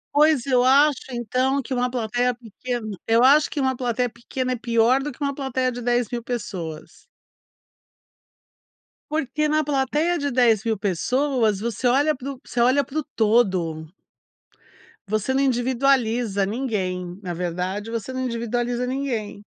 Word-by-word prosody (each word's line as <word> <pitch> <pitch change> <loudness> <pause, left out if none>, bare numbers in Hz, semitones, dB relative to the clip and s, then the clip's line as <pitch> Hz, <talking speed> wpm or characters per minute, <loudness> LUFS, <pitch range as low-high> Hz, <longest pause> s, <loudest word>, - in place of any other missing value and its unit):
Pois 300 -4 +4
eu 250 -2 +3
acho 280 +2 +5
então 255 +3 0
que 265 0 -4
uma 250 0 0
plateia 245 +1 0
pequena, 230 -2 -5
eu 230 +2 +4
acho 290 +3 +6
que 295 - -4
uma 260 -1 +1
plateia 245 0 -1
pequena, 255 +2 -4
é - - 0
pior 235 +2 +2
do 295 +1 -4
que 260 - -17
uma 280 -1 -1
plateia 260 -2 -1
de 245 0 -6
10.000 240 0 0
pessoas. 190 -10 -6 2.1
Porque 305 0 -1
na 310 0 +2
plateia 295 +5 +1
de 285 -1 -2
10.000 230 -3 +2
pessoas 220 - 0
você 235 +2 -1
olha 285 +4 +3
para 270 +2 -6
o 255 - -14
você 240 - -5
olha 260 +4 +4
para 310 +3 -4
o - - -3
todo. 185 -8 +1 1.2
Você 215 +5 0
não 270 - +2
individualiza 245 -5 +1
ninguém, 190 -6 -3
na 180 -3 -4
verdade 180 +5 -3
você 230 +3 -4
não 260 - -3
individualiza 240 +1 -2
ninguém. 240 -6 -3
245 Hz, 145 wpm, -23 LUFS, 220-265 Hz, 2.1 s, acho